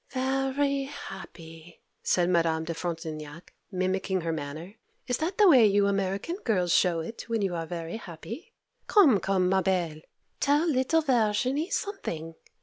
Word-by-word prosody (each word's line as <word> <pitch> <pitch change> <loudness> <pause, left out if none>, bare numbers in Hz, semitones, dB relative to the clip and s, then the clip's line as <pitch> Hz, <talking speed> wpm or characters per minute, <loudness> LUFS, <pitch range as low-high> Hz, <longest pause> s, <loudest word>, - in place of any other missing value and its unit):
'Very 270 +1 0
happy!' 170 - -10 0.2
said 175 -1 +2
Madame 165 -2 +2
de 165 +1 -3
Frontignac, 160 -2 -6 0.2
mimicking 185 0 -1
her 165 0 -2
manner. 155 +4 -6 0.3
'Is 250 -2 -1
that 350 +4 -2
the 420 - +6
way 265 -9 +7
you 200 0 +3
American 195 - -1
girls 185 - 0
show 170 -3 +3
it 225 +7 -8
when 225 -3 0
you 190 -2 0
are 165 -1 -3
very 170 +3 -5
happy? 210 - -9 0.4
Come, 300 - +6
come, 190 -2 +1
ma 190 +1 +3
belle, 175 -4 -1 0.4
tell 295 +4 +2
little 310 +2 +2
Verginie 255 - +1
something. 170 - -3
190 Hz, 145 wpm, -28 LUFS, 170-265 Hz, 0.4 s, way